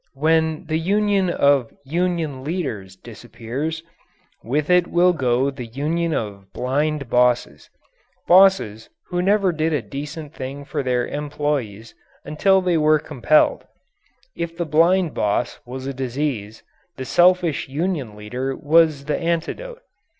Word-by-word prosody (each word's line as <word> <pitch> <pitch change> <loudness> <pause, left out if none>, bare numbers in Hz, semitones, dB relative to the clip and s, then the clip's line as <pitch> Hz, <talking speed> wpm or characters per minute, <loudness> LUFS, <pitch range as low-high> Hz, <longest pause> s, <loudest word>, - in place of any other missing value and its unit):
When 160 +3 +1
the 155 0 -1
union 200 +1 +1
of 140 -7 +2
"union 165 -3 -2
leaders" 130 - -4
disappears, 120 +9 -6 0.6
with 145 +5 -1
it 180 -1 +4
will 180 +1 +3
go 130 -2 +1
the 125 -3 -8
union 155 +7 -2
of 100 -7 -4
blind 145 +2 -1
bosses 125 0 +1 0.6
bosses 180 - +4 0.2
who 175 -1 -1
never 195 0 +2
did 160 0 -1
a 145 - 0
decent 145 +6 -7
thing 135 +1 -7
for 145 0 -3
their 125 -2 0
employees 145 -7 -3 0.3
until 190 +5 +2
they 180 -3 +1
were 155 0 +4
compelled. 150 0 +1 0.7
If 170 0 -5
the 170 - -1
blind 165 +3 +3
boss 105 +3 -1
was 130 +1 -7
a 135 - -3
disease, 130 -4 -4 0.3
the 130 - -5
selfish 175 -3 +3
union 145 - -2
leader 125 +6 -4
was 155 -2 +3
the 150 - -1
antidote. 455 - -3
150 Hz, 130 wpm, -21 LUFS, 125-170 Hz, 0.7 s, it